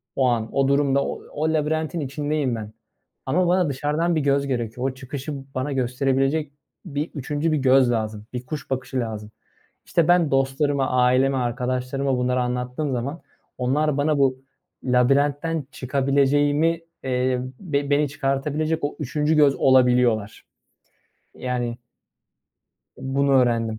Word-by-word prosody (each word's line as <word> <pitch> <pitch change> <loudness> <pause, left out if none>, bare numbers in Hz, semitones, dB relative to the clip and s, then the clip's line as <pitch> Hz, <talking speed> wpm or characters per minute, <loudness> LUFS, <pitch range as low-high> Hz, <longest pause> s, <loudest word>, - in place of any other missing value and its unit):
o 130 - +2
an, 115 -2 0
o 135 -1 +3
durumda, 140 0 +2
o - - -5
o 160 +1 0
labirentin 155 +2 -1
içindeyim 145 -2 -1
ben 110 -1 -7 0.5
ama 175 +7 +2
bana 180 -2 +2
dışarıdan 150 +5 0
bir 155 - +1
göz 140 0 +1
gerekiyor. 125 -1 -2
O - - -7
çıkışı 135 +3 -6 0.2
bana 130 +3 -2
gösterebilecek 135 +3 0 0.3
bir 150 -1 -3
3'üncü 145 +3 -1
bir - - +2
göz 130 -2 +4
lazım, 110 -2 -3
bir 125 0 -5
kuş 140 +1 -6
bakışı 130 0 -2
lazım. 110 -2 -5 0.5
İşte, 165 -2 +1
ben 175 -3 +4
dostlarıma, 135 +1 +1
aileme, 130 +2 +3
arkadaşlarıma 130 +2 -1
bunları 125 0 +1
anlattığım 125 +4 -2
zaman 135 +7 -3 0.4
onlar 145 +4 +1
bana 145 0 +1
bu 130 -2 +3 0.5
labirentten 140 +5 +2
çıkabileceğimi, 145 +4 +1 0.2
eee, 125 -1 0 0.2
ve 145 -6 -1
beni 145 0 +2
çıkartabilecek 150 +3 -1
o 145 - -2
3'üncü 150 +2 0
göz 145 -2 +5
olabiliyorlar. 125 -5 +3 0.9
Yani 120 -2 -3 1.2
bunu 140 +1 0
öğrendim. 115 -3 0
135 Hz, 130 wpm, -23 LUFS, 125-150 Hz, 1.2 s, göz